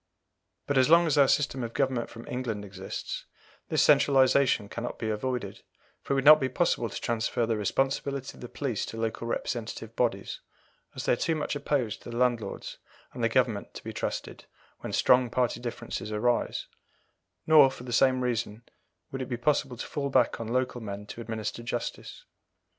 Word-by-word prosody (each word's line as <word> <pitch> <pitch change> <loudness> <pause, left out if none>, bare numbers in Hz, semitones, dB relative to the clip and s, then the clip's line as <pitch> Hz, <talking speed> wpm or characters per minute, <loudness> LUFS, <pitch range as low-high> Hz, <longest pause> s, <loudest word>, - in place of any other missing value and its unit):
But 140 -2 +2
as 130 - +4
long 170 +1 +7
as 155 - +2
our 140 -2 +6
system 135 -2 +1
of 115 0 -6
government 130 -4 0
from 115 0 -11
England 115 -5 -3
exists, 95 -1 -6 0.4
this - - +3
centralization 130 -5 +4
cannot 115 +3 -5
be 110 -1 -2
avoided, 110 -2 -3 0.4
for - - -2
it - - +2
would 135 0 0
not 155 +1 +10
be 130 -2 0
possible 130 -4 +1
to - - -5
transfer 115 0 0
the 115 0 0
responsibility 135 +5 -1
of - - -15
the 120 - -7
police 130 -7 -2
to 115 - -7
local 115 +1 -3
representative 115 -1 -4
bodies, 100 -5 -1 0.6
as - - -5
they - - +3
are - - +3
too 160 +6 0
much 150 -1 -2
opposed 140 -6 -1
to - - -10
the 120 - -5
landlords 120 -2 -1 0.3
and - - -5
the - - +3
Government - - 0
to - - -8
be - - -6
trusted - - -4 0.3
when - - -6
strong 125 -1 +4
party 125 0 0
differences 120 -3 -5
arise; 120 +3 0 0.8
nor, 155 -4 +7
for 130 -2 -10
the 125 -1 -5
same 130 +1 +4
reason, 115 -2 -2 0.5
would 135 - -4
it 130 - -5
be 120 - -2
possible 130 -1 0
to - - -5
fall 140 -2 -3
back 125 -3 +2
on 115 - -4
local 125 +1 -1
men 105 -1 -6
to 115 - -8
administer 110 0 -4
justice. 120 0 -5
120 Hz, 185 wpm, -28 LUFS, 115-135 Hz, 0.8 s, not